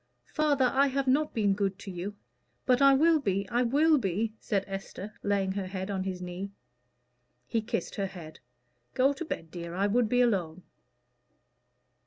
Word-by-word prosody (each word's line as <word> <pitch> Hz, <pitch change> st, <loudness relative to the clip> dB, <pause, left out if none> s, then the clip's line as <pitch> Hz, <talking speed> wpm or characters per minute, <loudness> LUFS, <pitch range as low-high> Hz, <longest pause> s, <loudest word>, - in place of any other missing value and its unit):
"Father, 285 Hz, -5 st, +2 dB
I 275 Hz, +1 st, +4 dB
have 275 Hz, 0 st, -1 dB
not 295 Hz, +4 st, +2 dB
been 205 Hz, -3 st, +3 dB
good 195 Hz, -1 st, -1 dB
to 200 Hz, -, -8 dB
you; 185 Hz, +3 st, -5 dB, 0.5 s
but 255 Hz, +1 st, +3 dB
I 275 Hz, 0 st, +7 dB
will 320 Hz, +3 st, +4 dB
be, 200 Hz, -6 st, -1 dB
I 240 Hz, +1 st, +1 dB
will 295 Hz, +5 st, +4 dB
be," 215 Hz, +1 st, -1 dB
said 200 Hz, -2 st, -1 dB
Esther, 195 Hz, +1 st, -7 dB
laying 200 Hz, -2 st, 0 dB
her 190 Hz, -1 st, -3 dB
head 190 Hz, +1 st, -4 dB
on 190 Hz, -1 st, -2 dB
his 185 Hz, -1 st, -4 dB
knee. 180 Hz, +2 st, -5 dB, 1.0 s
He 225 Hz, -, -1 dB
kissed 230 Hz, +1 st, -3 dB
her 200 Hz, -1 st, 0 dB
head. 165 Hz, -5 st, -10 dB, 0.6 s
"Go 270 Hz, +2 st, +4 dB
to 310 Hz, -, -5 dB
bed, 165 Hz, -, -5 dB
dear; 170 Hz, -1 st, -6 dB
I 195 Hz, +2 st, +1 dB
would 225 Hz, +2 st, +2 dB
be 245 Hz, +1 st, +3 dB
alone." 185 Hz, -7 st, 0 dB
205 Hz, 175 wpm, -29 LUFS, 190-255 Hz, 1.0 s, I